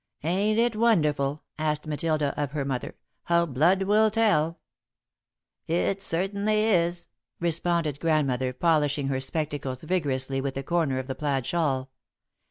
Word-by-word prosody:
"Ain't 200 Hz, +7 st, +1 dB
it 235 Hz, -1 st, +2 dB
wonderful," 150 Hz, -10 st, +1 dB, 0.2 s
asked 150 Hz, -1 st, -1 dB
Matilda 155 Hz, -1 st, 0 dB
of 145 Hz, -2 st, -3 dB
her 145 Hz, -3 st, -2 dB
mother, 130 Hz, -2 st, -3 dB, 0.3 s
"how 170 Hz, 0 st, +3 dB
blood 170 Hz, +7 st, +2 dB
will 215 Hz, +3 st, +4 dB
tell?" 205 Hz, -8 st, +2 dB, 1.1 s
"It 185 Hz, +4 st, 0 dB
certainly 200 Hz, +5 st, 0 dB
is," 175 Hz, -5 st, +1 dB, 0.3 s
responded 170 Hz, -3 st, 0 dB
Grandmother, 135 Hz, -6 st, +1 dB
polishing 145 Hz, -1 st, +1 dB
her 130 Hz, -1 st, 0 dB
spectacles 140 Hz, -2 st, -3 dB
vigorously 135 Hz, -6 st, -1 dB
with 135 Hz, 0 st, -3 dB
a 135 Hz, -, -3 dB
corner 160 Hz, -4 st, 0 dB
of 130 Hz, -, -3 dB
the 130 Hz, -, -4 dB
plaid 135 Hz, -2 st, -1 dB
shawl. 135 Hz, -5 st, -1 dB
155 Hz, 135 wpm, -26 LUFS, 140-175 Hz, 1.1 s, will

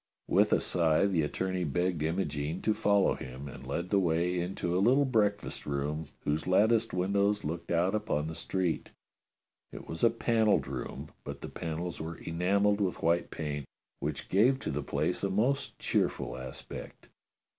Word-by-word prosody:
With -, -, +4 dB
a -, -, +5 dB
sigh 80 Hz, 0 st, +3 dB
the 95 Hz, -5 st, +2 dB
attorney 95 Hz, +4 st, -1 dB
begged 90 Hz, +2 st, 0 dB
Imogene 80 Hz, -1 st, -1 dB
to 110 Hz, -, +3 dB
follow 100 Hz, -2 st, +3 dB
him, 65 Hz, +2 st, -7 dB
and -, -, -9 dB
led 85 Hz, +1 st, -3 dB
the 100 Hz, -, +5 dB
way 90 Hz, 0 st, +1 dB
into 90 Hz, 0 st, -2 dB
a 90 Hz, -, +3 dB
little 130 Hz, +7 st, +5 dB
breakfast 105 Hz, -5 st, 0 dB
room 75 Hz, +2 st, -2 dB, 0.2 s
whose 75 Hz, +3 st, -1 dB
latticed 110 Hz, +4 st, +4 dB
windows 100 Hz, +3 st, +1 dB
looked 85 Hz, +3 st, -4 dB
out 85 Hz, +3 st, +2 dB
upon 105 Hz, -9 st, 0 dB
the 80 Hz, -, -4 dB
street. 90 Hz, 0 st, -2 dB, 0.8 s
It -, -, -9 dB
was 80 Hz, -, -5 dB
a 115 Hz, -, +7 dB
panelled 115 Hz, -2 st, +2 dB
room, -, -, -5 dB
but -, -, -7 dB
the -, -, -6 dB
panels 85 Hz, +1 st, -4 dB
were 80 Hz, +1 st, -5 dB
enamelled 100 Hz, +5 st, +1 dB
with 95 Hz, -3 st, -1 dB
white 85 Hz, +1 st, +2 dB
paint, 75 Hz, -3 st, -4 dB, 0.3 s
which 75 Hz, -1 st, -3 dB
gave 120 Hz, +8 st, +4 dB
to -, -, -2 dB
the 75 Hz, -, -2 dB
place 90 Hz, -, -1 dB
a 100 Hz, -, +1 dB
most 120 Hz, +8 st, 0 dB
cheerful -, -, 0 dB
aspect. 65 Hz, 0 st, -8 dB
90 Hz, 165 wpm, -30 LUFS, 80-100 Hz, 0.8 s, a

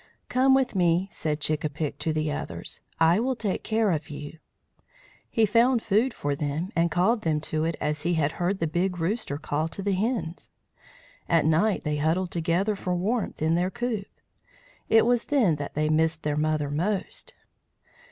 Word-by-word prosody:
"Come 265 Hz, +1 st, +4 dB
with 265 Hz, -2 st, +1 dB
me," 175 Hz, -1 st, +2 dB
said 155 Hz, -3 st, -2 dB
Chick 155 Hz, 0 st, -1 dB
a 155 Hz, -, 0 dB
pick 150 Hz, 0 st, -4 dB
to 160 Hz, -, -1 dB
the 155 Hz, -1 st, -1 dB
others. 145 Hz, -, -5 dB, 0.2 s
"I 165 Hz, +4 st, +5 dB
will 255 Hz, +3 st, 0 dB
take 210 Hz, -5 st, -2 dB
care 220 Hz, -2 st, +1 dB
of 160 Hz, -2 st, -2 dB
you." 145 Hz, +2 st, -8 dB, 0.9 s
He 225 Hz, -, +3 dB
found 230 Hz, +3 st, +3 dB
food 225 Hz, +6 st, +2 dB
for 145 Hz, -9 st, -2 dB
them, 150 Hz, +6 st, -3 dB
and 170 Hz, 0 st, +3 dB
called 185 Hz, +8 st, +2 dB
them 155 Hz, -4 st, +1 dB
to 155 Hz, 0 st, -2 dB
it 165 Hz, 0 st, -1 dB
as 150 Hz, 0 st, -1 dB
he 170 Hz, +2 st, +1 dB
had 150 Hz, -2 st, +1 dB
heard 185 Hz, +3 st, +1 dB
the 165 Hz, -, -1 dB
Big 175 Hz, +3 st, -1 dB
Rooster 175 Hz, -2 st, -2 dB
call 155 Hz, +1 st, -2 dB
to 180 Hz, +4 st, -7 dB
the 200 Hz, 0 st, +1 dB
hens. 190 Hz, -4 st, -2 dB, 0.8 s
At 165 Hz, -3 st, +3 dB
night 170 Hz, +7 st, +2 dB
they 150 Hz, -1 st, -1 dB
huddled 165 Hz, +5 st, 0 dB
together 175 Hz, +5 st, 0 dB
for 180 Hz, -2 st, -2 dB
warmth 205 Hz, -1 st, -1 dB
in 160 Hz, +1 st, +2 dB
their 175 Hz, +2 st, +1 dB
coop. 220 Hz, -2 st, -3 dB, 0.8 s
It 225 Hz, 0 st, +6 dB
was 240 Hz, 0 st, +2 dB
then 230 Hz, -, +2 dB
that 145 Hz, -1 st, -6 dB
they 155 Hz, +1 st, +1 dB
missed 160 Hz, +1 st, +1 dB
their 150 Hz, -1 st, 0 dB
mother 150 Hz, -1 st, 0 dB
most. 195 Hz, -, -2 dB
170 Hz, 185 wpm, -26 LUFS, 155-210 Hz, 0.9 s, It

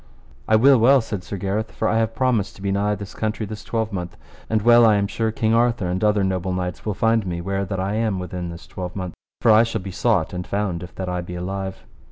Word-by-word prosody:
I 110 Hz, -, +4 dB
will 130 Hz, +3 st, +6 dB
well, 135 Hz, +4 st, +6 dB
said 105 Hz, -5 st, -4 dB
Sir 100 Hz, +3 st, -6 dB
Gareth, 100 Hz, +4 st, -2 dB
for -, -, -1 dB
I 110 Hz, -, +2 dB
have 115 Hz, 0 st, -1 dB
promised 125 Hz, -6 st, +1 dB
to 95 Hz, -, -12 dB
be 100 Hz, -, 0 dB
nigh 105 Hz, +1 st, +1 dB
this 100 Hz, -1 st, -8 dB
country 110 Hz, 0 st, -2 dB
this 105 Hz, +1 st, -8 dB
twelvemonth. 105 Hz, -6 st, -3 dB, 0.3 s
And 110 Hz, -2 st, +1 dB
well 120 Hz, +1 st, +7 dB
I 110 Hz, -2 st, +6 dB
am 100 Hz, 0 st, +1 dB
sure 110 Hz, +2 st, -1 dB
King 110 Hz, 0 st, 0 dB
Arthur 115 Hz, -3 st, +2 dB
and 90 Hz, +2 st, -2 dB
other 105 Hz, -1 st, +3 dB
noble 95 Hz, -1 st, -1 dB
knights 90 Hz, +2 st, -4 dB
will 105 Hz, -, -1 dB
find 115 Hz, +1 st, +2 dB
me 85 Hz, -1 st, -3 dB
where 95 Hz, +2 st, -2 dB
that 95 Hz, 0 st, -3 dB
I 95 Hz, +2 st, -1 dB
am 110 Hz, -3 st, 0 dB
within 90 Hz, -1 st, -5 dB
this 85 Hz, 0 st, -9 dB
twelvemonth. 90 Hz, -1 st, -6 dB, 0.3 s
For 115 Hz, -, +5 dB
I 110 Hz, +1 st, +7 dB
shall 115 Hz, -2 st, -1 dB
be 95 Hz, +1 st, -6 dB
sought 95 Hz, -4 st, +1 dB
and 90 Hz, 0 st, -5 dB
found, 100 Hz, -4 st, -2 dB
if 90 Hz, -2 st, -10 dB
that 95 Hz, -, -4 dB
I 90 Hz, 0 st, -2 dB
be 90 Hz, 0 st, -7 dB
alive. 95 Hz, +1 st, -4 dB
100 Hz, 250 wpm, -22 LUFS, 90-110 Hz, 0.3 s, well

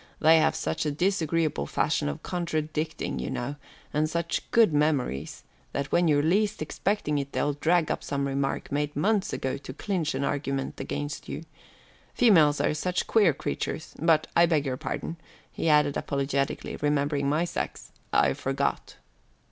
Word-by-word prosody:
They 160 Hz, +1 st, +6 dB
have 160 Hz, 0 st, +2 dB
such 155 Hz, -, -2 dB
a 150 Hz, -, 0 dB
disagreeable 165 Hz, -, 0 dB
fashion 70 Hz, -, 0 dB
of 70 Hz, -, -6 dB
contradicting, 155 Hz, -, -2 dB
you 65 Hz, -, -3 dB
know, 140 Hz, +4 st, -3 dB, 0.4 s
and 155 Hz, +1 st, +1 dB
such 170 Hz, +1 st, -2 dB
good 225 Hz, -8 st, +5 dB
memories, 145 Hz, -, 0 dB, 0.3 s
that 140 Hz, 0 st, -3 dB
when 175 Hz, 0 st, +3 dB
you're 145 Hz, -2 st, +3 dB
least 205 Hz, +6 st, +2 dB
expecting 155 Hz, -1 st, -1 dB
it 140 Hz, -, -3 dB
up -, -, -31 dB
they'll 145 Hz, -, +1 dB
drag 160 Hz, +3 st, +2 dB
some 140 Hz, -1 st, -2 dB
remark 135 Hz, 0 st, -2 dB
made 145 Hz, +1 st, -1 dB
months 200 Hz, +6 st, +1 dB
ago 130 Hz, +1 st, -2 dB
to 135 Hz, -1 st, -9 dB
clinch 170 Hz, -1 st, -2 dB
an -, -, -1 dB
argument 135 Hz, -1 st, -2 dB
against 145 Hz, 0 st, -4 dB
you. -, -, -5 dB, 0.7 s
Females 160 Hz, -11 st, +5 dB
are -, -, +2 dB
such 180 Hz, +4 st, -1 dB
queer 205 Hz, -7 st, +4 dB
creatures 155 Hz, +3 st, -4 dB
but 160 Hz, -1 st, +4 dB
I 170 Hz, 0 st, +6 dB
beg 155 Hz, -3 st, +1 dB
your 130 Hz, -2 st, -1 dB
pardon," 165 Hz, +5 st, -4 dB, 0.3 s
he 165 Hz, -, -1 dB
added 150 Hz, -2 st, +4 dB
apologetically, 140 Hz, 0 st, -2 dB
remembering 145 Hz, -1 st, +1 dB
my 155 Hz, +4 st, +2 dB
sex. -, -, -5 dB, 0.2 s
"I -, -, +4 dB
forgot." -, -, -2 dB
150 Hz, 160 wpm, -27 LUFS, 140-170 Hz, 0.7 s, They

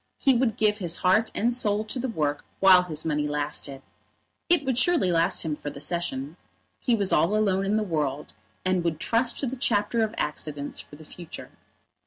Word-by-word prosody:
He 270 Hz, -, +3 dB
would 240 Hz, -3 st, +1 dB
give 210 Hz, -1 st, +2 dB
his 175 Hz, -3 st, +1 dB
heart 210 Hz, +5 st, +3 dB
and 235 Hz, +3 st, +1 dB
soul 215 Hz, -3 st, +1 dB
to 220 Hz, +4 st, -3 dB
the 260 Hz, -, -2 dB
work 150 Hz, -, -2 dB, 0.2 s
while 190 Hz, -2 st, +7 dB
his 160 Hz, -4 st, -4 dB
money 150 Hz, -2 st, 0 dB
lasted. 145 Hz, -2 st, -3 dB, 0.7 s
It 345 Hz, -5 st, +3 dB
would 260 Hz, -2 st, +1 dB
surely 305 Hz, -, +3 dB
last 170 Hz, +2 st, +1 dB
him 155 Hz, -2 st, -2 dB
for 145 Hz, -, -6 dB
the 140 Hz, -1 st, -10 dB
Session. 150 Hz, -2 st, -3 dB, 0.4 s
He 240 Hz, -, +1 dB
was 200 Hz, -3 st, +1 dB
all 165 Hz, +7 st, +3 dB
alone 195 Hz, -2 st, +1 dB
in 210 Hz, +2 st, +1 dB
the 215 Hz, -, +1 dB
world, 150 Hz, -7 st, -3 dB, 0.3 s
and 185 Hz, -1 st, +1 dB
would 165 Hz, -2 st, -1 dB
trust 235 Hz, +5 st, +1 dB
to -, -, +1 dB
the 260 Hz, +1 st, -3 dB
chapter 225 Hz, -2 st, +1 dB
of 220 Hz, 0 st, -1 dB
accidents 150 Hz, -1 st, -3 dB
for -, -, -11 dB
the 155 Hz, +1 st, -14 dB
future. 170 Hz, +1 st, -10 dB
185 Hz, 200 wpm, -26 LUFS, 150-220 Hz, 0.7 s, while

